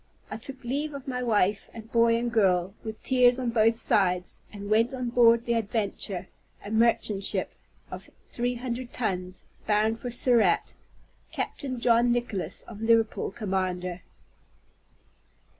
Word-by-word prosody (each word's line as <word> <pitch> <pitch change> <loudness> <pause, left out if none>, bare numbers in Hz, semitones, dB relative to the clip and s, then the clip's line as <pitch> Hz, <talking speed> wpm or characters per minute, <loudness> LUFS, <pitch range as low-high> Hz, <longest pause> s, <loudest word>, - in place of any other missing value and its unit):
I - - -4
took 260 +4 -9
leave 285 +5 -3
of 275 -1 -9
my 250 -1 -3
wife 205 -4 +1
and 225 0 -10
boy 230 0 +4
and 240 0 -2
girl, 190 -4 +2
with 220 -1 -7
tears 250 -1 +4
on 250 -2 -2
both 225 0 +3
sides, 180 -5 +1
and 200 -1 -8
went 225 +5 +2
on 250 -2 -3
board 235 -1 +5
the 235 - +1
Adventure, 205 -4 -2 0.4
a 205 - -6
merchant 220 -3 +2
ship, - - -2 0.4
of - - -8 0.2
three 245 +1 -2
hundred 245 0 -5
tons, 185 -5 -3 0.2
bound 215 +1 +2
for 245 - -5
Surat, 235 -6 +3 0.6
Captain 260 -4 -4
John 235 0 +3
Nicholas 240 -6 -2
of 220 -2 -11
Liverpool, 225 -1 +2
commander. 185 -4 -3
230 Hz, 140 wpm, -27 LUFS, 200-245 Hz, 0.6 s, board